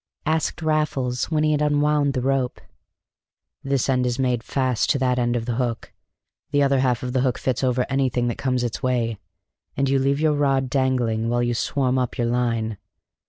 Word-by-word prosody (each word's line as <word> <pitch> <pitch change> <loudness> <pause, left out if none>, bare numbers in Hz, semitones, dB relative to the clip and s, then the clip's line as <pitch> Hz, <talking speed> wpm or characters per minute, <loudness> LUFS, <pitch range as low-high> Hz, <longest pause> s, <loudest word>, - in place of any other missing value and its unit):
asked 160 +1 -1
Raffles 150 -5 0
when 155 -2 0
he 155 - +3
had 150 -1 +1
unwound 145 -1 +2
the 125 - -1
rope. 135 -2 0 1.0
"This 135 -2 0
end 130 -2 +1
is 120 0 -1
made 125 -3 0
fast 130 -1 0
to - - +3
that 125 -1 +1
end 120 0 +1
of 115 -1 -2
the 115 -1 -2
hook, 120 -3 -3 0.6
the 145 0 +2
other 140 -1 +3
half 125 -2 +1
of 125 -1 -3
the 130 - +2
hook 130 -2 0
fits 130 0 -2
over 125 -1 +1
anything 130 -3 0
that 120 - -3
comes 130 -2 0
its 120 -2 -3
way, 120 -4 0 0.6
and 135 +1 +1
you 135 0 +2
leave 140 +1 +1
your 155 -1 +2
rod 135 -3 +1
dangling 125 -5 +1
while 120 0 +1
you 120 0 0
swarm 130 +2 0
up 125 0 -2
your 120 - 0
line. 115 -3 -1
130 Hz, 200 wpm, -23 LUFS, 120-140 Hz, 1.0 s, he